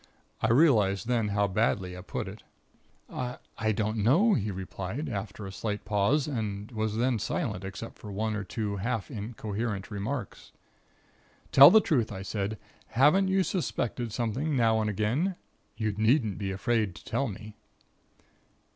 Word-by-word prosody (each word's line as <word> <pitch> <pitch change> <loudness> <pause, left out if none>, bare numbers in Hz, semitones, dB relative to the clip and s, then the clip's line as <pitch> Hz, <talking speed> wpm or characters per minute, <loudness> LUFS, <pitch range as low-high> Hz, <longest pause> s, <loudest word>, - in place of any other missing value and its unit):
I - - +2
realized 115 - +4
then 120 -3 +1
how 100 0 +1
badly 95 -2 0
I 90 - -8
put - - -4
it. - - -9 0.7
"'I 125 0 -4 0.2
I 110 -1 +1
don't 110 +1 -1
know,' 155 - +4
he 105 - 0
replied, 95 - -5
after 105 -3 -5
a 95 - -6
slight 105 +1 -4
pause 105 +8 +2
and 105 -5 -3
was 110 -1 -2
then 120 -1 +1
silent, 95 -1 -2
except 95 +4 -7
for 105 - -8
one 110 +2 -1
or 105 - -3
two 100 0 -3 0.3
incoherent 105 -1 -4
half - - -17
remarks. 105 +2 -5 1.0
"'Tell 140 +1 +11
the 220 - +7
truth,' 125 - +1
I 95 -1 -6
said. 100 +1 -3 0.3
'Haven't 150 - +4
you 190 0 +3
suspected 120 - -2
something, 125 +7 -1
now 115 -3 +3
and 105 - 0
again? 120 - 0 0.4
You 110 -1 0
needn't 110 -1 +2
be 100 -2 -2
afraid 105 0 0
to - - -13
tell 140 - 0
me.' 105 0 -8
110 Hz, 155 wpm, -29 LUFS, 100-125 Hz, 1.0 s, Tell